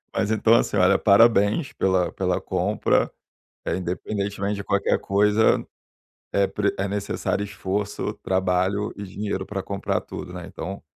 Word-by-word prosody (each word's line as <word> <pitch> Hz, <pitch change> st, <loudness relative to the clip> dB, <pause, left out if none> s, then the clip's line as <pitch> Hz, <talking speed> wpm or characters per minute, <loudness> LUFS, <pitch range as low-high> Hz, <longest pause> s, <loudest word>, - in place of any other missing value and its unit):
mas 105 Hz, -, 0 dB
então, 110 Hz, +1 st, +3 dB
assim, 105 Hz, -, +1 dB
olha: 95 Hz, +1 st, +5 dB
parabéns 105 Hz, +5 st, +4 dB
pela 95 Hz, -2 st, +1 dB
pela 90 Hz, -2 st, -1 dB
compra. -, -, +1 dB, 0.5 s
Eh, -, -, 0 dB
independentemente 100 Hz, +3 st, -3 dB
de 100 Hz, -, -5 dB
qualquer 100 Hz, 0 st, +1 dB
coisa, 105 Hz, +2 st, +3 dB, 0.7 s
é 100 Hz, 0 st, +3 dB
pre 105 Hz, +1 st, -1 dB
é 100 Hz, +1 st, -1 dB
necessário 100 Hz, 0 st, -2 dB
esforço, 100 Hz, 0 st, -3 dB
trabalho 95 Hz, +2 st, 0 dB
e 100 Hz, -, -7 dB
dinheiro 100 Hz, +2 st, -4 dB
pra 100 Hz, -2 st, -4 dB
comprar 100 Hz, 0 st, -2 dB
tudo, 90 Hz, -, -8 dB
né. 90 Hz, -2 st, -7 dB
Então, 95 Hz, 0 st, -7 dB
100 Hz, 140 wpm, -24 LUFS, 95-105 Hz, 0.7 s, olha